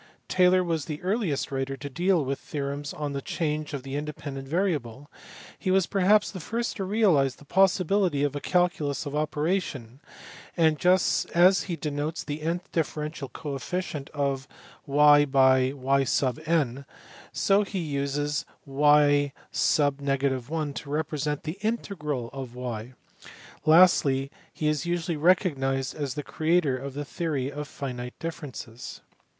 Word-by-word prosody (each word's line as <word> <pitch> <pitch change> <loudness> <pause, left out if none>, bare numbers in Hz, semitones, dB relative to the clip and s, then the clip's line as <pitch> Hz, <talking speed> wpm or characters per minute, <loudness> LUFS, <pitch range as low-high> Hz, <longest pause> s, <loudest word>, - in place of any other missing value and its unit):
Taylor 185 0 +4
was 165 -4 -1
the 150 -1 -5
earliest 185 - -1
writer 135 0 -2
to 145 - -6
deal 170 +2 +1
with 135 +1 -2
theorems 145 0 -4
on 145 -2 -4
the 140 - -3
change 155 0 -2
of 140 -3 -5
the 135 0 -5
inde 150 0 -4
pendent 135 -2 -7
variable; 145 - -2 0.5
he - - -2
was 190 -1 +4
perhaps 200 +3 +3
the 190 - -7
first 235 +7 -3
to 195 - -2
realize 185 - +3
the 145 - -17
possibility 185 -3 +2
of 145 -1 0
a - - -2
calculus 160 -6 0
of 145 0 -4
operation, 150 -5 -2 0.6
and 160 -2 +3
just 180 +1 +3
as 185 +3 +5
he 170 - -1
denotes 150 0 -3
the 150 +1 -5
nth 170 +3 -1
differential 150 -3 -3
coefficient 150 +1 -4
of 140 -2 -2 0.4
y 145 +1 +6
by 130 -2 +4
y 135 0 +1 0.4
n, 140 -5 +1 0.5
so 200 +1 +3
he 200 -1 -4
uses 145 -2 -1 0.2
y_ 145 0 +4 0.4
l 140 0 0
to 140 +3 -7
represent 150 -1 -2
the 160 +5 -5
integral 150 - -3
of 130 -3 -7
y\ 125 -1 -5 0.7
lastly 145 -5 +5 0.2
he 155 - -2
is 150 0 +1
usually 175 0 -1
recognized 140 -6 +1
as 145 -4 -4
the 150 - -4
creator 160 -3 +1
of 135 +1 -6
the 145 0 -4
theory 140 -4 -2
of 150 +1 -6
finite 125 -3 -6
differences. 145 -8 -7
150 Hz, 145 wpm, -27 LUFS, 135-170 Hz, 0.7 s, y